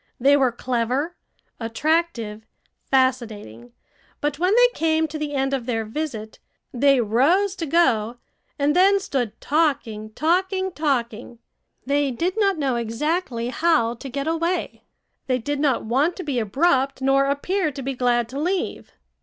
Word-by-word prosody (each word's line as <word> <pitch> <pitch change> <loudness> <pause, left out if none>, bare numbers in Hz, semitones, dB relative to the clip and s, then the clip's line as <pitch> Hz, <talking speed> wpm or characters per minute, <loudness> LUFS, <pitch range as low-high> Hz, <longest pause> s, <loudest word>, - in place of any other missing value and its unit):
They 275 +3 +5
were 265 -3 +3
clever, 255 +7 -2 0.4
attractive, 230 -2 -1 0.5
fascinating; 225 - -1 0.5
but 295 0 -2
when 365 +4 +2
they - - +7
came 320 0 +1
to 310 0 -6
the 295 -1 -3
end 270 0 0
of 260 -3 -2
their 225 -3 -1
visit, 220 -3 -5 0.3
they 275 +1 +4
rose 295 - +2
to 330 - -3
go, 245 -8 +2 0.4
and 290 0 +1
then 390 +2 +5
stood 270 - -3
talking, 270 -9 0
talking, 375 - 0
talking. 245 -7 -2 0.5
They 285 +1 +1
did 335 +9 -1
not 395 -4 +2
know 270 -5 0
exactly 240 +1 -2
how 310 -5 +2
to 270 +3 -9
get 275 +2 -3
away. 335 +3 -2 0.4
They 255 -1 +1
did 285 +4 -3
not 280 -6 +1
want 275 +10 +1
to 370 - -6
be 280 -5 -1
abrupt 270 - +1
nor 270 +1 +3
appear 310 +5 0
to 275 - -7
be 270 +1 -2
glad 245 -2 +1
to 270 +3 -5
leave. 360 +4 -2
275 Hz, 150 wpm, -23 LUFS, 240-325 Hz, 0.5 s, they